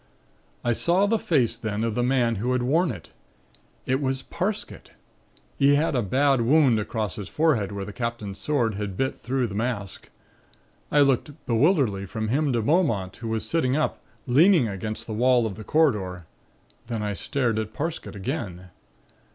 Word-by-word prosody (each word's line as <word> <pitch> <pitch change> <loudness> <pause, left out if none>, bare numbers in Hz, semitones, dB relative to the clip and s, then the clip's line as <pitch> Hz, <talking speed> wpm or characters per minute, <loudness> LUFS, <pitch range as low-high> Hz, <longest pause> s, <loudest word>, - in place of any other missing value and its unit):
I 120 -1 +2
saw 175 - +2
the 220 +2 +1
face 130 - +1
then 110 -2 -3
of 115 -1 -1
the 120 - 0
man 120 -3 +2
who 125 +5 0
had 125 -1 0
worn 160 +7 +2
it. 90 -9 -10 0.7
It 130 +2 0
was 135 -1 -1
Parsket. 210 +4 -4 0.7
He 140 0 +5
had 150 0 +1
a 125 - +2
bad 135 +5 +2
wound 130 -2 +4
across 105 -1 -3
the 105 - -5
forehead 145 -12 +1
where 100 -1 -4
the 105 - -8
Captain's 115 -5 -4
sword 125 -7 0
had 100 -2 -5
bit 135 0 -1
through 130 +1 -1
the 105 - -5
mask. 105 -3 -3 0.8
I 145 - +5
looked 140 +2 +1
bewilderedly 115 - +2
from 110 +2 -3
him 145 +3 +1
to 115 -2 0
Beaumont, 115 - +1
who 115 - -6
was 110 -1 -2
sitting 140 -5 +1
up, 155 - -1 0.2
leaning 150 - +5
against 105 +2 -5
the 110 - -5
wall 125 +1 +3
of 110 - -3
the 110 - -9
corridor. 105 - +1 0.6
Then 115 -3 -3
I 105 -1 -1
stared 115 +1 -1
at 110 -1 -4
Parsket 155 -4 -4
again. 95 - -5
120 Hz, 175 wpm, -25 LUFS, 105-145 Hz, 0.8 s, He